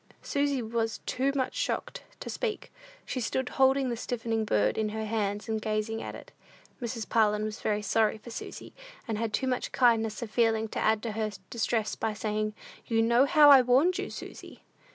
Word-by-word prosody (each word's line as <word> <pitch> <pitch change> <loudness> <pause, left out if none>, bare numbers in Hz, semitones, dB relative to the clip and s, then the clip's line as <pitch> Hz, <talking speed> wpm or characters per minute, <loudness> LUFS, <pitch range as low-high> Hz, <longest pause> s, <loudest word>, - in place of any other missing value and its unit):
Susy 280 -3 0
was 225 0 -1
too 270 +2 0
much 260 -2 -1
shocked - - -3 0.2
to - - -8
speak. - - -4 0.3
She 255 - -3
stood 255 +3 -1
holding 265 0 +3
the 240 - -1
stiffening 225 -2 -2
bird 105 - +2
in 215 -1 0
her 220 +1 -4
hands, 210 -2 -2
and 220 -1 -2
gazing 215 +1 -2
at - - -6
it. - - -12 0.5
Mrs. 230 -3 -4
Parlin 210 -2 +2
was 215 0 -5
very 210 -1 0
sorry 220 +1 +2
for 235 +2 -11
Susy, - - -8 0.3
and 220 -2 -2
had 225 -1 -1
too 265 - 0
much 255 -1 -1
kindness 225 -2 +2
of 220 - -7
feeling 225 -1 +2
to - - -4
add 220 -1 +2
to 230 - -2
her 215 0 -2 0.2
distress 225 -1 0
by 220 -1 -2
saying, 215 0 -2 0.3
"You 225 -1 +2
know 235 +3 +4
how 295 -1 +7
I 270 -2 +9
warned 265 +9 +3
you, - - -3
Susy." - - -10
225 Hz, 195 wpm, -29 LUFS, 215-250 Hz, 0.5 s, I